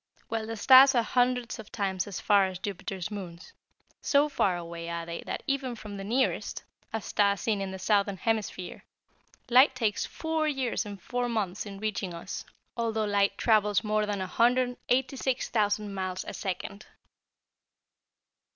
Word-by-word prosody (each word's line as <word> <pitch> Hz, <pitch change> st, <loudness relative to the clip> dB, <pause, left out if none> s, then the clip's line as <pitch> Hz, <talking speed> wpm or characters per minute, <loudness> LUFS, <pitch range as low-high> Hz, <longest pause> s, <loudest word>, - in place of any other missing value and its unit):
Well, 225 Hz, -1 st, -2 dB
the 225 Hz, 0 st, -5 dB
stars 265 Hz, +4 st, +8 dB
are 235 Hz, -, +4 dB
hundreds 245 Hz, 0 st, 0 dB
of 220 Hz, -, -10 dB
times 195 Hz, -2 st, -1 dB
as 200 Hz, -, -5 dB
far 200 Hz, -2 st, +4 dB
away 190 Hz, -, -3 dB
as -, -, -6 dB
Jupiter's 190 Hz, 0 st, -5 dB
moons. 175 Hz, -5 st, -8 dB, 0.5 s
So 290 Hz, +1 st, +3 dB
far 190 Hz, -10 st, +1 dB
away 170 Hz, 0 st, -6 dB
are 170 Hz, 0 st, -4 dB
they 170 Hz, 0 st, -5 dB
that -, -, -4 dB
even 270 Hz, -3 st, -1 dB
from 210 Hz, -2 st, -8 dB
the 195 Hz, -, -6 dB
nearest 245 Hz, +6 st, -1 dB, 0.3 s
a 225 Hz, -, -1 dB
star 200 Hz, -1 st, +1 dB
seen 205 Hz, +1 st, -1 dB
in 195 Hz, -, -3 dB
the 190 Hz, -, -6 dB
southern 200 Hz, +1 st, +1 dB
hemisphere 210 Hz, -3 st, -2 dB, 0.6 s
light 255 Hz, +2 st, +6 dB
takes 225 Hz, -5 st, 0 dB
four 320 Hz, -1 st, -1 dB
years 265 Hz, -7 st, -1 dB
and 200 Hz, -1 st, -7 dB
four 245 Hz, +5 st, -2 dB
months 210 Hz, -3 st, -2 dB
in 200 Hz, -1 st, -8 dB
reaching 200 Hz, -4 st, -3 dB
us, 170 Hz, +3 st, -6 dB, 0.3 s
although 225 Hz, -2 st, 0 dB
light 200 Hz, -1 st, +1 dB
travels 210 Hz, -3 st, +3 dB
more 215 Hz, 0 st, +1 dB
than 205 Hz, -1 st, -1 dB
186,000 245 Hz, -1 st, 0 dB
miles 185 Hz, -1 st, -3 dB
a -, -, -5 dB
second." 195 Hz, +2 st, -5 dB
210 Hz, 160 wpm, -28 LUFS, 195-245 Hz, 0.6 s, stars